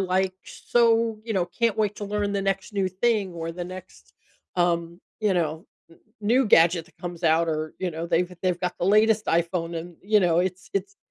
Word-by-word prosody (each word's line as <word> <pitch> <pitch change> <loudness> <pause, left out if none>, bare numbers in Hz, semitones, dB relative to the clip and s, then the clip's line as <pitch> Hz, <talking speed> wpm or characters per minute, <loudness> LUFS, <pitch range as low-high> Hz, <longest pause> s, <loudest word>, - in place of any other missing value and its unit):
like, 190 0 +1
so, 230 -2 +1
you 230 - -3
know, 185 - +2
“Can't 230 +5 0
wait 210 -1 0
to 205 - -5
learn 205 0 -1
the 200 - 0
next 195 +1 -2
new 195 -2 0
thing 200 0 0
or 165 0 -4
the 175 0 -5
next”, 80 - -11 0.4
um, 170 0 0 0.2
you 205 -3 +2
know, 160 -1 -1 0.2
“n 165 - -19 0.2
new 240 +4 +3
gadget 165 -2 +4
that - - -24
comes 175 -1 -7
out” 165 +1 +4
or, 155 0 -2
you 185 -2 -2
know, 165 +1 -5
they've 180 +2 0
they've 180 -2 +1
got 180 -1 -2
the - - -1
latest 215 +1 +4
iPhone 170 0 0
and, 170 +1 -9
you 210 +2 +3
know, 170 -2 +3
it's 185 +1 -3
it's 200 +1 -2
185 Hz, 205 wpm, -25 LUFS, 170-205 Hz, 0.4 s, gadget